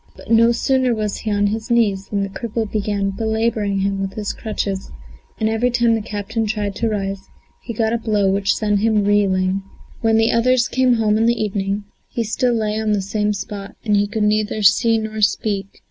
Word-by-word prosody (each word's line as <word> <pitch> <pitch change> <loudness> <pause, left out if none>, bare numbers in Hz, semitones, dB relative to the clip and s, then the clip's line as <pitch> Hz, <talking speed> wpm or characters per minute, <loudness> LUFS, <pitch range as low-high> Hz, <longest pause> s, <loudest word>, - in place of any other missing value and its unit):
But - - -10
no 230 +1 +6
sooner 255 0 +1
was 210 -2 -2
he 220 - -4
on 205 0 +2
his 220 +3 -2
knees 210 -5 +2
than 200 -1 -1
the 195 - -3
cripple 225 +2 -3
began 205 -2 -1
belabouring 220 -1 -1
him 195 0 -1
with 195 0 -3
his 210 -2 -3
crutches, 200 -3 -4 0.5
and 220 - +1
every 225 +3 +1
time 240 -1 +2
the 225 - 0
captain 215 +1 -3
tried 205 -1 -2
to 230 - 0
rise, 195 -2 -3 0.3
he 235 - -6
got 225 0 0
a 235 - 0
blow 210 -3 +1
which 195 +1 +1
sent 210 -2 +1
him 215 -1 +2
reeling. 195 -2 +2 0.4
When 225 -1 +2
the 225 0 +3
others 245 +1 +3
came 255 -1 +2
home 215 -1 +2
in 225 - +3
the 235 0 +2
evening, 200 -1 -1 0.3
he 235 - -2
still 240 +3 0
lay 215 -1 -1
on 215 -1 0
the 205 - +1
same 210 +2 0
spot 200 0 -6
and 205 -1 +2
could 220 -1 -1
neither 215 0 +1
see 225 +3 +4
nor 220 0 -4
speak. 205 -1 +1
215 Hz, 205 wpm, -20 LUFS, 200-225 Hz, 0.5 s, no